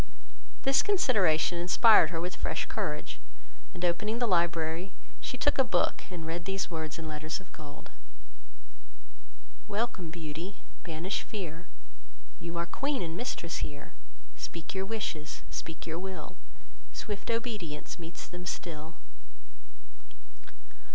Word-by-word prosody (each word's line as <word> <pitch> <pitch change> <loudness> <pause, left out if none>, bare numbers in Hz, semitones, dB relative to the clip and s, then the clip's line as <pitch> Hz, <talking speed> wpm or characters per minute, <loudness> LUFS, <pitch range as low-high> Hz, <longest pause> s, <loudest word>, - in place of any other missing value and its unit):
This 270 0 +6
consideration 190 - +4
inspired 180 0 +8
her 165 -2 -1
with 180 +2 -1
fresh - - 0
courage; - - -2 0.5
and 180 -2 -1
opening 210 +6 +2
the 240 - +3
library, 170 -1 +2 0.3
she 255 - -3
took 290 +2 +4
a - - +9
book, 180 -8 +2
and 175 -3 -5
read 170 +1 -2
these 195 -1 -1
words 160 -2 -2
in 165 -1 -5
letters 155 +2 -2
of 195 - -15
gold: 145 -2 -10 1.8
"Welcome, 205 -5 0
Beauty, 165 +3 -5 0.2
banish 170 +4 -1
fear, 175 -6 -5 0.7
You 170 0 -4
are 170 - +1
queen 275 - 0
and 165 -1 -3
mistress 175 -7 -2
here; 145 -1 -4 0.4
Speak 170 +2 -5
your 190 0 -1
wishes, 180 -8 -2
speak 165 -1 -4
your 165 +1 -2
will, 190 0 -5 0.6
Swift 210 0 -4
obedience 215 -11 -2
meets 165 0 -6
them 180 0 -7
still." 160 -2 -4
175 Hz, 125 wpm, -32 LUFS, 165-205 Hz, 1.8 s, a